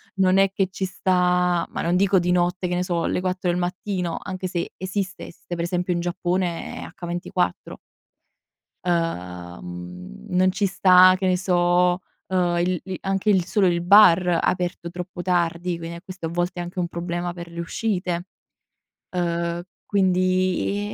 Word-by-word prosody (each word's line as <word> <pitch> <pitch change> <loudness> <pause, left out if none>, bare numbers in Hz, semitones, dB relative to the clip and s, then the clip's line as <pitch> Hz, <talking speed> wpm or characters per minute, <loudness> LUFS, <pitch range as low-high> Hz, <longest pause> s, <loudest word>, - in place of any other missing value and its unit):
non 190 0 +3
è 195 -1 +4
che 195 -1 +1
ci 190 - -5
sta 180 -2 +1
ma - - -4
non 170 +1 +1
dico 195 0 +4
di 175 +1 0
notte 180 +1 +1
che 180 - -1
ne 180 - 0
so 175 -2 -1
le - - 0
4 185 0 -1
del 175 - -1
mattino, 180 0 -2
anche 185 -1 -4
se 175 -1 -3
esistesse, 190 -2 -5
per 170 - -3
esempio 180 +1 -1
in 170 - -1
Giappone 175 0 -2
è - - -8
H24. 175 +1 -3 1.1
Ehm, 90 - -4
non 185 +1 +3
ci 200 +2 0
sta, 185 -1 +6
che 190 0 -1
ne 185 -1 +3
so, 180 0 +2 0.3
uhm, 180 -2 +1
il 180 0 0
lì 190 -1 -4
anche 195 +2 0
il 190 -3 +4
solo 195 0 +2
il 170 -1 +1
bar 180 -2 +6
aperto 175 -1 -1
troppo 180 +1 -6
tardi, 175 -1 0
quindi 165 0 -7
a 170 - -9
questo 185 -2 -6
a - - -5
volte 175 +2 -2
è - - -3
anche 175 +1 -6
un 175 - 0
problema 175 +1 -3
per 170 -1 -8
le 170 - -7
uscite. 180 -1 -2 0.8
Ehm, 170 -1 -1 0.2
quindi 185 +1 +1
180 Hz, 165 wpm, -23 LUFS, 175-185 Hz, 1.1 s, sta